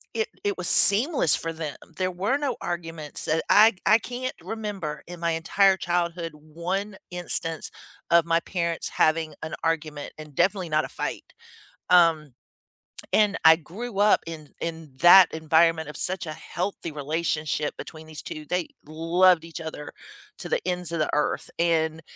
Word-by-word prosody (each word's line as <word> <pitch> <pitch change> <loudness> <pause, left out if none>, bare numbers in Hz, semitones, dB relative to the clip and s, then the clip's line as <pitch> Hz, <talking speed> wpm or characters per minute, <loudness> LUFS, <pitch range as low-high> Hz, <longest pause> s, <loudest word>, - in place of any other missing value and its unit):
it 220 -1 0 0.2
it 205 -1 -1
was 180 -1 -2
seamless 220 - +6
for 165 0 -4
them. 155 -4 -6 0.2
There 185 -1 0
were 200 +10 0
no 285 -4 -2
arguments 165 -3 -4
that, 160 +1 0
I 215 +1 +6
I 215 +3 +5
can't 250 +4 -5
remember 200 -9 -5
in 175 0 -9
my 170 0 0
entire 190 +4 +3
childhood 170 -2 -2
one 175 +7 -5
instance 165 -2 -3 0.4
of 170 -1 +5
my 165 0 +2
parents 170 -2 -2
having 155 -1 +1
an 160 - -6
argument, 155 -3 -2
and 155 -1 -11
definitely 185 +1 +1
not 155 0 +1
a - - -9
fight. - - -5 0.6
Um, 165 -6 +4 0.8
and 210 -2 +3
I 160 0 +8
grew 195 +7 -8
up 210 +1 +4
in 155 -3 -9
in 165 -3 -6
that 175 +1 +8
environment 160 0 +2
of - - -10
such 185 -1 -2
a 155 - -4
healthy 170 +1 -5
relationship 150 0 -2
between 160 -1 -10
these 155 -1 -9
2. 155 -1 -8
They 180 +2 -2 0.2
loved 165 +2 +3
each 165 0 -8
other 160 -2 -7 0.5
to - - -7
the - - 0
ends 180 -2 -1
of 165 - -2
the 155 - 0
earth, 150 - -1
and, 160 -1 +1
165 Hz, 160 wpm, -25 LUFS, 160-185 Hz, 0.8 s, I